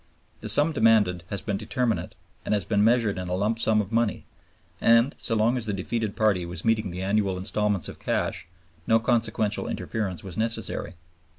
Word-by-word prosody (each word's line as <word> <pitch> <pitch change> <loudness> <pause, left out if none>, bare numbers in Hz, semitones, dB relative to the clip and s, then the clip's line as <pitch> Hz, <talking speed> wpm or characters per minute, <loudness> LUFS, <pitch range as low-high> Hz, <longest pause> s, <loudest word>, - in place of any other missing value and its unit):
The - - -5
sum 150 +3 +3
demanded 110 - +3
has 100 - -4
been 100 -3 -1
determinate 115 +3 -2 0.3
and - - +1
has 100 - -1
been 105 -2 +2
measured 115 -4 +2
in 90 - -5
a 90 - 0
lump 105 +4 0
sum 110 -1 +3
of 100 0 -7
money; 115 -1 0 0.6
and 115 +4 +5
so 115 - -1
long 115 +4 +2
as 115 -3 -3
the 105 - -1
defeated 105 +2 -2
party 105 -5 +2
was 85 +2 -7
meeting 110 -3 +1
the 90 +1 -5
annual 100 -1 +1
instalments 105 0 0
of - - -9
cash - - -2 0.4
no 115 0 +5
consequential 110 -3 0
interference 95 -6 -3
was 95 -3 -8
necessary. 110 -4 -2
110 Hz, 185 wpm, -26 LUFS, 100-115 Hz, 0.6 s, and